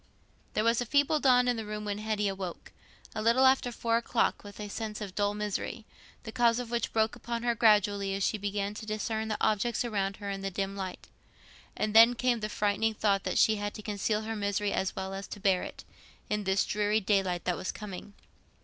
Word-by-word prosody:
There 215 - +2
was 230 +1 +3
a - - -1
feeble 285 +3 +3
dawn 250 -3 +4
in 245 -1 +1
the 225 - -3
room 210 0 -5
when 205 0 -3
Hetty 215 -1 -1
awoke, 190 -3 -5 0.4
a 215 - -3
little 235 +4 +4
after 260 -2 +4
four 230 0 0
o'clock, 235 0 0
with 205 0 -11
a 210 - -5
sense 215 +1 -5
of 200 -3 -6
dull 205 +1 0
misery, 210 +2 -3 0.4
the 220 - -7
cause 235 0 +3
of 245 -2 -5
which 235 0 -1
broke 220 0 +1
upon 235 0 -4
her 240 -1 +2
gradually 205 -3 +3
as 195 - -2
she 215 - 0
began 200 0 -2
to 215 +1 -8
discern 220 +1 -2
the 215 - -2
objects 230 +3 +1
round 195 -4 -1
her 200 -1 -5
in 195 0 -4
the 195 - -2
dim 195 +1 -3
light. 190 -2 -6 0.7
And 215 - -1
then 230 +2 +8
came 245 -1 +1
the 215 0 -3
frightening 210 +1 0
thought 200 -2 +2
that - - -1
she 220 -1 +4
had 205 0 -4
to 215 - -8
conceal 210 +1 -1
her 225 +1 -4
misery 205 0 -1
as 190 - -1
well 190 0 -4
as 195 0 -6
to - - -8
bear 190 -2 +2
it, - - -8 0.5
in 210 -1 -1
this 190 0 +2
dreary 210 +1 +1
daylight 190 -4 +1
that 180 - +1
was 185 - -3
coming. 205 -1 -8
210 Hz, 220 wpm, -30 LUFS, 200-225 Hz, 0.7 s, then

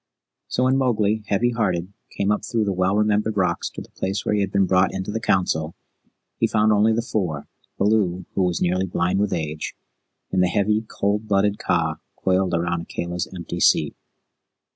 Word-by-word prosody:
So 125 - 0
when 130 +1 +3
Mowgli, 110 -5 +1
heavy 120 +5 +2
hearted, 95 -5 -1 0.2
came 100 +1 +1
up 105 - 0
through 115 -2 0
the 100 - 0
well 95 +1 +1
remembered 105 0 +1
rocks 90 -3 0
to - - -8
the - - -19
place 95 +1 -3
where - - +1
he 105 - +2
had 100 -1 -1
been 100 -1 +3
brought 95 0 +3
into 95 +1 -4
the 115 - -2
Council, 85 -6 0 0.6
he - - +3
found 110 0 +3
only 105 +1 +4
the 115 +1 0
Four, 90 - -2 0.3
Baloo, 100 -4 +1
who - - 0
was 90 -2 +1
nearly 90 +2 +1
blind 90 +2 0
with 105 -1 +1
age, 80 -2 -3 0.6
and 95 - +2
the 90 - +4
heavy, 105 +3 +1
cold 105 +2 -1
blooded 100 0 +2
Kaa 80 -3 0 0.2
coiled 95 -1 +1
around 85 0 -1
Akela's 85 +1 -4
empty 90 -1 -6
seat. - - +3
95 Hz, 185 wpm, -23 LUFS, 90-105 Hz, 0.6 s, only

